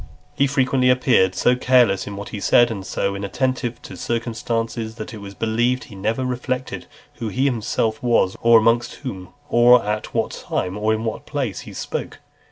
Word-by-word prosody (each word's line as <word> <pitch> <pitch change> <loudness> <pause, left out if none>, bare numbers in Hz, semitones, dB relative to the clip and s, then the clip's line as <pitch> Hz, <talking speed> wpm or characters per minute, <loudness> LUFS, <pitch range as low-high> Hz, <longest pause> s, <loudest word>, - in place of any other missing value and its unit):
XL. - - -19
He 140 - +2
frequently 130 -1 +2
appeared 125 -7 +3
so 125 +7 +3
careless 125 -6 +3
in 100 - -6
what 100 +1 -7
he 105 - -6
said, 120 +4 +4
and 100 -4 -5
so 100 +1 -2
inattentive 120 +4 -2
to - - -9
circumstances, 115 -1 -3
that 115 +1 -7
it 110 - -8
was 100 0 -9
believed 120 +4 0
he 105 - -12
never 110 +6 -1
reflected 125 +1 -3 0.3
who 115 - -4
he 130 +6 0
himself 115 -3 -1
was, 115 -6 +2
or 115 0 +7
amongst 115 +1 +2
whom, 95 -7 -6 0.2
or 120 -1 +6
at 105 +1 -2
(328) - - -18
what - - -1
time, 90 +1 -2
or 105 +1 0
in 110 0 -1
what 110 -1 -4
place, 135 - -3
he - - -10
spoke. - - -5
115 Hz, 190 wpm, -21 LUFS, 105-125 Hz, 0.3 s, or